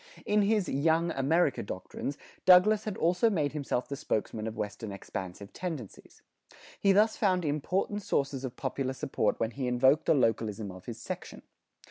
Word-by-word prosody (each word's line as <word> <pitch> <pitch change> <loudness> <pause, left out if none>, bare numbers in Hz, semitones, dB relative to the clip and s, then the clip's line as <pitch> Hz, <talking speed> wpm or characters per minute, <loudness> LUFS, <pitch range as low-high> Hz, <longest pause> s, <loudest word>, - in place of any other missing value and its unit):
In 210 0 +3
his 205 -1 +2
"Young 160 +4 +2
America" 145 +2 +2
doctrines 100 +9 -5 0.3
Douglas 200 +4 +6
had 210 -3 -3
also 180 +7 +3
made 155 -9 0
himself 140 -4 -2
the 140 - -4
spokesman 110 -3 -2
of 110 - -6
Western 105 +1 -4
expansive 95 0 -7
tendencies. 160 - -7 0.6
He 195 - +4
thus 215 +3 +4
found 185 -5 +2
important 180 +8 -1
sources 140 -7 -1
of 130 -2 -5
popular 130 0 -2
support 135 +1 -1
when 115 0 0
he 130 0 -3
invoked 130 +5 +3
the - - +5
localism 110 -5 0
of 90 0 -12
his - - -5
section. - - -7
140 Hz, 160 wpm, -30 LUFS, 115-180 Hz, 0.6 s, Douglas